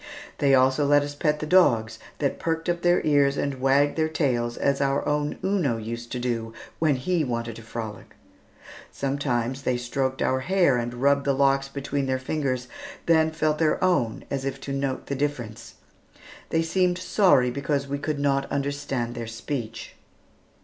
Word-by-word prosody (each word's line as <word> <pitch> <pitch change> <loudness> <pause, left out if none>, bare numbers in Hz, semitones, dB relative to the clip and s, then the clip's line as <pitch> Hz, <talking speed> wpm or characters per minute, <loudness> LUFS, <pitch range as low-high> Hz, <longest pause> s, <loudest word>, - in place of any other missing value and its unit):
They 140 -2 +4
also 130 +2 +3
let 145 0 +5
us 145 0 -5
pet 150 +1 0
the - - -2
dogs 145 -11 +3 0.2
that - - -1
perked 165 0 -2
up 175 0 0
their 175 0 +3
ears 140 -2 +3
and 140 -2 -2
wagged 140 +3 +3
their 160 0 +1
tails 120 -7 0
as 140 0 +1
our 140 0 0
own 150 0 0
Uno 180 - +1
used 115 +2 -6
to 125 - -2
do 115 -2 -3 0.2
when 155 -3 +3
he 165 +6 0
wanted 115 -3 -3
to - - -9
frolic. 110 -2 -7 0.8
Sometimes 135 -2 -1
they 125 -2 0
stroked 130 +2 -2
our 130 - +1
hair 175 -1 +3
and 120 0 -2
rubbed 140 0 +3
the 140 -1 +2
locks 135 0 +2
between 140 0 -3
their 130 0 +1
fingers, 130 -2 -2 0.4
then 160 -1 +4
felt 155 -1 0
their 160 -2 +2
own 150 -12 +1
as 135 -1 -2
if 135 0 -3
to 140 - -5
note 135 -1 -2
the - - -4
difference. 130 -6 -4 0.7
They 165 0 +1
seemed 180 +1 +1
sorry 180 -9 +3
because 140 +1 -1
we 140 +1 -3
could 150 +1 -2
not 140 -1 0
understand 140 -4 -2
their 115 -1 -5
speech. 115 0 -5
140 Hz, 175 wpm, -25 LUFS, 125-150 Hz, 0.8 s, let